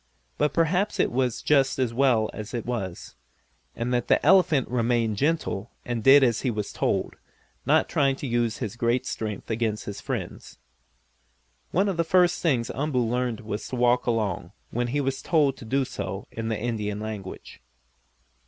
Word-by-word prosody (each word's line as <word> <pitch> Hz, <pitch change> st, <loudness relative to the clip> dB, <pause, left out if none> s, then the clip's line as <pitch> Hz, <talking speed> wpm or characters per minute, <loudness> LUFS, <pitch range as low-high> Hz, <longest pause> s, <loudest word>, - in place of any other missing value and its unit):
But 150 Hz, -1 st, +2 dB
perhaps 180 Hz, +6 st, +1 dB
it -, -, +2 dB
was 125 Hz, -1 st, -1 dB
just 135 Hz, -3 st, +3 dB
as 125 Hz, -3 st, 0 dB
well 120 Hz, -4 st, +2 dB
as 110 Hz, +3 st, -6 dB
it 115 Hz, -, -3 dB
was, 100 Hz, -8 st, -4 dB, 0.6 s
and 120 Hz, +2 st, -2 dB
that 120 Hz, -1 st, 0 dB
the -, -, +3 dB
elephant 175 Hz, -8 st, +5 dB
remained 115 Hz, -3 st, 0 dB
gentle 140 Hz, -7 st, -1 dB, 0.2 s
and 120 Hz, -2 st, -3 dB
did 135 Hz, +1 st, +8 dB
as 120 Hz, -3 st, +2 dB
he 130 Hz, -, 0 dB
was 105 Hz, -3 st, -3 dB
told, -, -, -1 dB, 0.5 s
not -, -, +4 dB
trying 135 Hz, -2 st, +2 dB
to 140 Hz, -, -7 dB
use 120 Hz, -2 st, 0 dB
his 110 Hz, -3 st, -4 dB
great 120 Hz, +2 st, 0 dB
strength 110 Hz, -2 st, -4 dB
against 110 Hz, -1 st, -1 dB
his 100 Hz, -, -6 dB
friends. -, -, -5 dB, 1.1 s
One 195 Hz, +3 st, +2 dB
of 190 Hz, -4 st, -1 dB
the 170 Hz, -, +2 dB
first 180 Hz, +1 st, +3 dB
things 130 Hz, -9 st, +1 dB
Umboo 135 Hz, -4 st, 0 dB
learned 120 Hz, -1 st, -1 dB
was 105 Hz, -1 st, -5 dB
to -, -, -5 dB
walk 125 Hz, 0 st, +2 dB
along, 110 Hz, -6 st, -1 dB, 0.2 s
when 120 Hz, +1 st, -1 dB
he 145 Hz, +4 st, 0 dB
was 135 Hz, -1 st, -2 dB
told 145 Hz, -5 st, +2 dB
to -, -, -10 dB
do 135 Hz, +4 st, +1 dB
so 95 Hz, -4 st, -5 dB
in 115 Hz, 0 st, -4 dB
the 110 Hz, -2 st, -1 dB
Indian 105 Hz, -3 st, -2 dB
language. 105 Hz, -3 st, -7 dB
120 Hz, 175 wpm, -26 LUFS, 110-135 Hz, 1.1 s, did